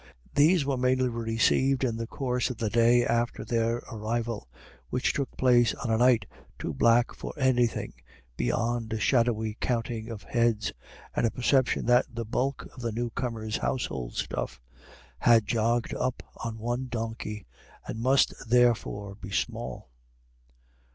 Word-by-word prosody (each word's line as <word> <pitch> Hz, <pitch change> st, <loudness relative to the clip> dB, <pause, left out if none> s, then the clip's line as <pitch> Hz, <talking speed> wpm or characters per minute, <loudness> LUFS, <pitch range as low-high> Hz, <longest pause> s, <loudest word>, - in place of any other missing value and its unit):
These 155 Hz, +1 st, +4 dB
were 135 Hz, -2 st, 0 dB
mainly 130 Hz, 0 st, +2 dB
received 115 Hz, +3 st, +1 dB
in 120 Hz, -3 st, +1 dB
the 115 Hz, 0 st, -4 dB
course 125 Hz, 0 st, -1 dB
of 125 Hz, -, -5 dB
the 110 Hz, -2 st, -2 dB
day 120 Hz, +1 st, +4 dB
after 120 Hz, -1 st, 0 dB
their 115 Hz, +1 st, 0 dB
arrival, 115 Hz, -, -3 dB, 0.4 s
which 125 Hz, -, 0 dB
took 140 Hz, -2 st, -3 dB
place 120 Hz, -2 st, +4 dB
on 115 Hz, -, -3 dB
a 110 Hz, -, +3 dB
night 120 Hz, -4 st, +4 dB, 0.3 s
too -, -, -4 dB
black 115 Hz, -, +3 dB
for -, -, -7 dB
anything 125 Hz, -4 st, +1 dB, 0.4 s
beyond 115 Hz, -, -1 dB
a 110 Hz, -, -2 dB
shadowy 115 Hz, -3 st, +1 dB
counting 115 Hz, -2 st, -2 dB
of 110 Hz, -3 st, -7 dB
heads, 115 Hz, -3 st, +1 dB, 0.4 s
and 115 Hz, -, +2 dB
a -, -, +1 dB
perception 125 Hz, +2 st, +1 dB
that 120 Hz, +1 st, +4 dB
the 115 Hz, -1 st, -4 dB
bulk 130 Hz, +5 st, -2 dB
of 130 Hz, -, -9 dB
the 115 Hz, -1 st, -2 dB
new 120 Hz, +2 st, -2 dB
comers' 110 Hz, -3 st, -3 dB
household 65 Hz, -, -3 dB
stuff -, -, -3 dB, 0.6 s
had 115 Hz, -2 st, +5 dB
jogged 115 Hz, +2 st, 0 dB
up 130 Hz, 0 st, -2 dB
on 115 Hz, -1 st, -5 dB
one 120 Hz, +3 st, -2 dB
donkey, 110 Hz, -3 st, -4 dB, 0.4 s
and 110 Hz, -, -5 dB
must 130 Hz, +4 st, +3 dB, 0.2 s
therefore 115 Hz, -4 st, +2 dB
be 95 Hz, -2 st, -10 dB
small. 110 Hz, -, -3 dB
120 Hz, 150 wpm, -28 LUFS, 110-125 Hz, 0.6 s, had